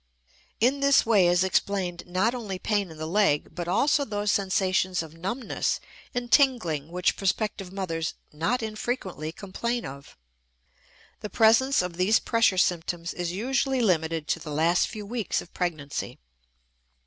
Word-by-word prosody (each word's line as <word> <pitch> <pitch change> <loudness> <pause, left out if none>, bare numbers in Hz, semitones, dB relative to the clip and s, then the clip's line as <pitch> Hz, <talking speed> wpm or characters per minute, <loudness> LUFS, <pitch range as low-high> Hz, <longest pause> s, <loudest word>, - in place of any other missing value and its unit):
In 255 +5 +3
this 280 -2 +4
way 205 -6 +4
is 175 +1 +3
explained 185 -2 -1
not 185 +6 +1
only 215 -7 -4
pain 205 0 -1
in 160 - -11
the 155 - -4
leg 170 -4 +1
but 175 -1 -5
also 285 - +3
those 205 -4 -1
sensations 185 -2 +1
of 160 -1 -11
numbness 195 +9 -2 0.4
and 245 -1 -3
tingling 220 - +3
which 180 +1 0
prospective 195 -1 -2
mothers 165 -4 -3 0.2
not 170 +11 -1
infrequently 215 - -4
complain 235 +7 -3
of. 140 +1 -10 1.0
The 210 - -6
presence 225 +3 +4
of 175 -1 -5
these 195 +5 +4
pressure 230 -5 +2
symptoms 175 -1 0
is 175 -1 -3
usually 265 +6 0
limited 160 -6 +1
to - - +1
the 155 - -8
last 165 +4 +2
few 215 -3 -7
weeks 225 -1 -2
of 175 - -10
pregnancy. 155 -6 -3
190 Hz, 150 wpm, -26 LUFS, 170-225 Hz, 1.0 s, this